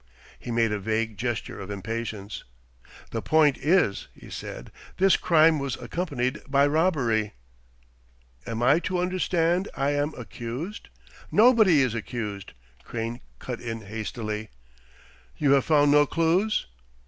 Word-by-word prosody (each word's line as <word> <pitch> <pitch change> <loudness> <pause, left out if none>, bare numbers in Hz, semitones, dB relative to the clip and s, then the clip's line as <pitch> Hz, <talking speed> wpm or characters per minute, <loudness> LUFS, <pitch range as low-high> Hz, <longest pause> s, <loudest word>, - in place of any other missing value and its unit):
He - - -9
made 115 -2 +2
a 105 - -1
vague 110 +2 -1
gesture 120 +1 -3
of 100 - -7
impatience. 105 0 -5 0.7
"The - - -3
point 155 -3 +4
is," 155 - +2
he - - -14
said, - - -7 0.3
"this 190 0 +5
crime 160 -2 +4
was 140 -2 -2
accompanied 140 -8 -3
by 140 +1 +4
robbery." 135 - +1 1.1
"Am 115 +1 -3
I 145 +6 +5
to 180 +1 -2
understand 180 0 +1
I 140 +1 +1
am 145 +1 -1
accused?" 125 - -6 0.4
"Nobody 215 - +6
is 125 -4 0
accused," 105 -3 -5 0.3
Crane 115 +1 -4 0.2
cut 125 -2 -6
in 115 -1 -5
hastily. 110 0 -5 0.9
"You 145 -2 +2
have 140 -1 +4
found 145 -2 +4
no 145 0 +5
clues 175 +8 +1
135 Hz, 130 wpm, -26 LUFS, 115-160 Hz, 1.1 s, Nobody